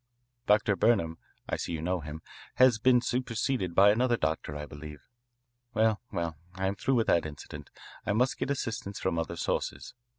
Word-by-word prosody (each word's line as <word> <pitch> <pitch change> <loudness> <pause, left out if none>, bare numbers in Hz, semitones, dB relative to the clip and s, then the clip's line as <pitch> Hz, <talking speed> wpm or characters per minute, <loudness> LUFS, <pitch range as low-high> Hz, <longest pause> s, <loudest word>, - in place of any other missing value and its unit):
Dr. 105 0 +4
Burnham 95 -6 +2 0.3
I - - -1
see - - -4
you 80 - -3
know 90 +1 0
him 75 +1 -8 0.3
has 130 -4 +5
been 125 +1 +5
superseded 120 -6 -1
by 100 +2 +7
another 120 +2 +2
doctor, 80 -3 -2
I 75 0 -5
believe. 75 0 -10 0.7
Well, 110 -1 +3
well, 85 -2 -3 0.2
I 95 0 -2
am 95 - +1
through 135 +5 0
with 115 -2 +3
that 85 -2 +2
incident. 75 -2 -9 0.3
I 105 - 0
must 125 +4 +1
get - - -2
assistance 115 -8 -3
from 85 -3 0
other 80 +1 -3
sources. 85 - -3
100 Hz, 175 wpm, -29 LUFS, 80-120 Hz, 0.7 s, by